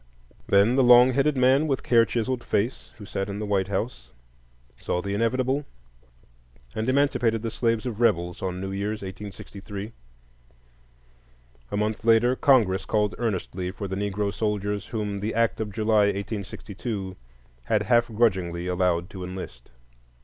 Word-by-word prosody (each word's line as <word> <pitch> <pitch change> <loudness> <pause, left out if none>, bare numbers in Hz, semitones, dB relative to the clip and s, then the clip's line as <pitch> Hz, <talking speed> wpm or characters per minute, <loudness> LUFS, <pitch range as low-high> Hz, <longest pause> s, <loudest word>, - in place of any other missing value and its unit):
Then 100 +6 +4
the 135 - +5
long 125 +1 +7
headed 140 +2 +2
man 130 +4 +4
with 135 -3 -1
care 115 -1 +4
chiselled 120 +1 -2
face 115 +6 -1
who 105 - -10
sat 100 -1 -3
in 100 - -4
the 105 - -3
White 100 -2 0
House 100 - -4 0.7
saw 90 - -2
the 100 +2 -3
inevitable, 130 +6 0 1.1
and 110 +3 -2
emancipated 125 -5 +2
the 115 - -2
slaves 115 0 0
of 120 -2 -4
rebels 90 -5 +1
on 90 -2 -3
New 95 +1 -4
Year's, 100 +2 -3
1863. 100 +1 -8 1.8
A - - -3
month 105 0 -1
later 115 +2 +4
Congress 110 -10 +3
called 105 -1 +1
earnestly 95 -5 -2
for 100 +2 -6
the 95 - -4
Negro 100 0 -2
soldiers 105 -2 -2
whom 105 -3 -3
the 105 +3 -3
act 115 -1 +1
of 105 -2 -3
July, 110 0 +3
1862, 100 0 -4 0.5
had - - +1
half 120 -1 +3
grudgingly 95 -7 0
allowed 90 -1 0
to 95 -2 -7
enlist. 90 -10 -8
105 Hz, 150 wpm, -25 LUFS, 95-115 Hz, 1.8 s, long